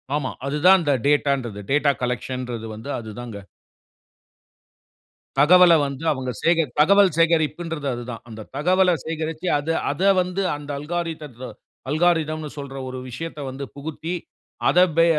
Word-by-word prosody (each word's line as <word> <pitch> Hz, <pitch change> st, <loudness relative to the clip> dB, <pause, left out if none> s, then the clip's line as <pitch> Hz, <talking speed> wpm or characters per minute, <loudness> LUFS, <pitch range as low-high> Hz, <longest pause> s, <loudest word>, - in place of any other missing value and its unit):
ஆமா. 145 Hz, -3 st, -2 dB
அதுதான் 155 Hz, +7 st, +5 dB
இந்த 145 Hz, -2 st, +2 dB
டேட்டா 145 Hz, -1 st, +3 dB
ன்றது, 110 Hz, -5 st, -7 dB
டேட்டா 145 Hz, 0 st, +4 dB
கலெக்ஷன் 125 Hz, +1 st, -3 dB
றது 115 Hz, -1 st, -5 dB
வந்து 110 Hz, +6 st, -9 dB
அது 110 Hz, -2 st, -8 dB
தான்ங்க. 115 Hz, -4 st, -7 dB, 2.0 s
தகவல 175 Hz, +4 st, +7 dB
வந்து 140 Hz, +2 st, -6 dB
அவுங்க 130 Hz, -3 st, -3 dB
சேக 165 Hz, 0 st, +4 dB, 0.2 s
தகவல் 200 Hz, +5 st, +6 dB
சேகரிப்புன்றது 165 Hz, -2 st, +1 dB
அது 120 Hz, 0 st, -5 dB
தான். 115 Hz, -, -8 dB
அந்த 110 Hz, -1 st, -9 dB
தகவல 180 Hz, +5 st, +3 dB, 0.2 s
சேகரிச்சு 160 Hz, +1 st, -4 dB
அது 160 Hz, +3 st, -1 dB, 0.2 s
அத 145 Hz, -, -6 dB, 0.2 s
வந்து 180 Hz, +2 st, -2 dB
அந்த 145 Hz, 0 st, -10 dB
அல்கோரித்ம் 150 Hz, -5 st, -5 dB, 0.4 s
அல்காரிதம் 155 Hz, 0 st, +1 dB
ன்னு 155 Hz, -, -6 dB
சொல்ற 140 Hz, -1 st, -7 dB
ஒரு 130 Hz, 0 st, -6 dB
விஷயத்த 160 Hz, +5 st, -6 dB
வந்து 135 Hz, +2 st, -6 dB
புகுத்தி 155 Hz, +3 st, -6 dB, 0.6 s
அத 180 Hz, -, +4 dB, 0.2 s
பே 165 Hz, -, +6 dB
150 Hz, 140 wpm, -23 LUFS, 130-165 Hz, 2.0 s, தகவல